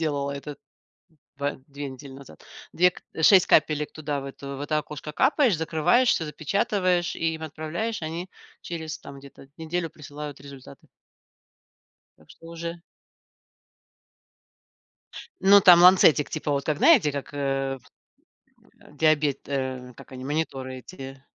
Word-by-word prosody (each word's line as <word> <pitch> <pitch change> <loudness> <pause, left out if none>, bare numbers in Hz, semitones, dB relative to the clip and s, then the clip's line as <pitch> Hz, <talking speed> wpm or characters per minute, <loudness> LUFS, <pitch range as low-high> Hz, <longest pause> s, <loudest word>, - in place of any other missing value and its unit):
делала 145 -3 -1
этот 140 +1 -8 0.8
ба 140 +1 -2
2 145 0 -7
недели 135 +1 -11
назад. 135 - -14 0.3
2 180 +2 +4
к - - -15
э, 160 - -4
6 185 +2 +7
капелек 150 -1 +2
туда 145 -2 -4
в - - -9
эту, 140 0 -8
в - - -9
это 150 +1 -1
окошко 150 0 -7
капаешь, 255 - +3
закрываешь, 160 +11 +2
всё 165 - +1
запечатываешь 180 - 0
и 165 -1 -1
им 160 - -8
отправляешь. 160 +8 -4
Они 165 +4 -5 0.3
через, 160 -2 -6
там, 140 0 -11
где-то 135 0 -15
неделю 165 +1 -3
присылают 145 -1 -9
результаты. 140 -2 -13 1.3
Так 80 - -23
что 165 - -15
уже 170 0 -7 2.6
Ну, 200 +1 +7
там 175 -2 +8
ланцетик, 180 -5 +6
типа, 155 -1 -3
вот, 140 -1 -1
как, 155 - -1
знаете, 245 - +5
как, 140 0 -6
э, 135 -1 -2
вс - - -25 0.9
а, - - -18
диабет, 150 -3 +2
э, 130 -2 -4
как - - -14
они, 130 0 -8
мониторы 135 -3 -3
эти. 135 -1 -10
150 Hz, 145 wpm, -25 LUFS, 140-170 Hz, 2.6 s, там